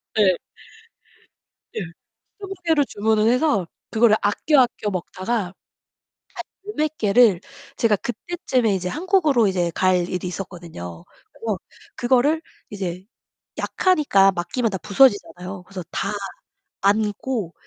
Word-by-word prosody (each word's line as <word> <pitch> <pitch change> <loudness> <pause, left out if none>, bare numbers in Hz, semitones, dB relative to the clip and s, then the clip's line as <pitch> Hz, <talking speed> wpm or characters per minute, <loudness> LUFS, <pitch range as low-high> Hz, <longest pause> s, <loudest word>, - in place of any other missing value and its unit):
네. 190 -5 +4 1.4
예. - - -1 0.6
20 390 -1 -6
개를 310 -4 +3
주문을 215 +1 +1
해서 250 - +2 0.2
그거를 225 -1 +4
아껴, 265 +8 +3
아껴 235 -4 0
먹다가 185 +4 -3
한 185 - -13 1.1
10 420 - -6
몇 305 0 0
개를 210 -3 +4 0.4
제가 220 -3 +3
그때쯤에 240 - -1
이제 180 -1 -2
한국으로 310 - +2
이제 175 -2 0
갈 180 -2 +2
일이 180 0 -3
있었거든요. 165 - -8 0.3
그래서 215 -5 -3 0.4
그거를 265 +6 +2 0.3
이제 185 -3 -5 0.5
약하니까 285 - +3
맡기면 220 +7 -1
다 190 - -3
부서지잖아요. 195 -4 +2
그래서 185 -1 -7
다 200 - -2 0.7
안고, 210 -1 0
210 Hz, 250 characters per minute, -22 LUFS, 185-255 Hz, 1.4 s, 네